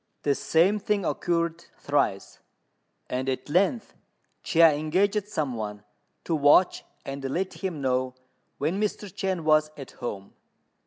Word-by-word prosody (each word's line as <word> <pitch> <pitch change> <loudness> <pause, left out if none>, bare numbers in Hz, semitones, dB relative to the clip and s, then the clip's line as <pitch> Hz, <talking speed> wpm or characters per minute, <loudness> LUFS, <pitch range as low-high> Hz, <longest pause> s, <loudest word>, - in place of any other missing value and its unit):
The 145 - +3
same 175 +9 +2
thing 205 -2 -1
occurred 170 -1 -1
thrice; 110 -9 -1 0.7
and 130 +1 -2
at 130 +2 -3
length 195 - +1 0.5
Chia 165 -2 +5
engaged 190 +8 0
some 155 -10 -2
one 105 -2 -5 0.4
to 170 - -2
watch 150 +5 +4 0.2
and 135 0 -6
let 180 +8 -2
him 180 -7 -4
know 130 -1 0 0.4
when 165 +8 -1
Mr. 210 0 -1
Chên 190 -3 -2
was 155 -1 +3
at 135 -3 -9
home. 100 -5 -7
155 Hz, 135 wpm, -26 LUFS, 135-185 Hz, 0.7 s, Chia